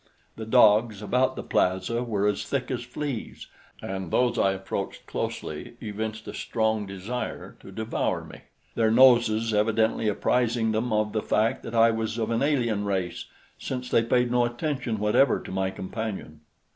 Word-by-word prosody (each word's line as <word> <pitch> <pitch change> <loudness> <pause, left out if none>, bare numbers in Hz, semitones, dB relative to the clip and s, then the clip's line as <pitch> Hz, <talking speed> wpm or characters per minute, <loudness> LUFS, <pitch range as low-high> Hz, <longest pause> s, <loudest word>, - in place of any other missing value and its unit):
The 110 -1 -7
dogs 110 -2 +4
about 125 +5 +1
the - - -5
plaza 95 +6 0
were 105 -4 -1
as 105 -1 +1
thick 140 - -2
as 125 - -2
fleas, 125 0 -5 0.4
and 95 -2 -4
those 125 +5 +2
I 95 - +3
approached 95 0 -5
closely - - -5
evinced 110 +1 -5
a - - -6
strong 110 -2 -1
desire 100 +6 -5
to - - -12
devour 110 +3 -2
me, - - -12 0.3
their 110 -1 +2
noses 115 -2 +5
evidently 110 +1 +2
apprising 115 +2 +1
them 110 +3 -1
of 105 0 +1
the 110 - 0
fact 110 +5 +1
that 115 - -7
I 115 0 +6
was 110 0 -2
of 115 -1 -1
an 115 - 0
alien 120 -8 +1
race, 95 -3 -2 0.3
since 125 -1 -5
they - - +5
paid 120 +1 +1
no 125 0 +3
attention 120 -1 -2
whatever 105 +6 +3
to - - -9
my 95 0 0
companion. 95 -5 -6
110 Hz, 165 wpm, -26 LUFS, 105-120 Hz, 0.4 s, I